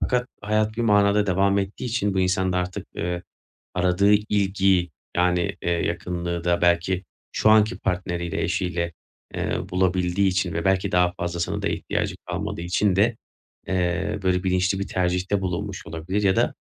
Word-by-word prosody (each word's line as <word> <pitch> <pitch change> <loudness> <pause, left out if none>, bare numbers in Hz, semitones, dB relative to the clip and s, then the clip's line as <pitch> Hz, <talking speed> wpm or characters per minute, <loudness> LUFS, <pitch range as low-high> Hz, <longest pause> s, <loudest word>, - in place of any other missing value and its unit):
fakat 125 -1 0 0.2
hayat 110 +1 0
bir 120 - 0
manada 105 -1 +4
devam 100 +2 +2
ettiği 100 +4 -3
için 110 -5 0
bu 95 - +2
insan 95 0 +1
da 90 - +1
artık, 90 0 -4
ııı, 90 0 -2 0.5
aradığı 90 +3 +3
ilgiyi, 95 -4 +2 0.3
yani, 90 0 +1
eee, - - -1
yakınlığı 85 0 -2
da 85 0 +1
belki 90 +2 +2 0.3
şu 110 - +2
anki 110 -3 +5
partneriyle, 90 -2 -2
eşiyle, 85 -1 -1 0.4
ııı, 95 - -2
bulabildiği 90 0 +1
için 95 0 0
ve - - -2
belki 95 0 +2
daha 90 0 +3
fazlasına 85 0 -2
da - - 0
ihtiyacı - - -2
kalmadığı 85 - -3
için 90 +2 +1
de, 110 +3 +3 0.5
eee, 90 +1 0
böyle 90 0 +1
bilinçli 95 +1 +1
bir 100 - -3
tercihte 90 +2 0
bulunmuş 95 +2 -4
olabilir 90 +3 -3
ya 95 -1 +3
da - - +2
95 Hz, 160 wpm, -24 LUFS, 90-100 Hz, 0.5 s, anki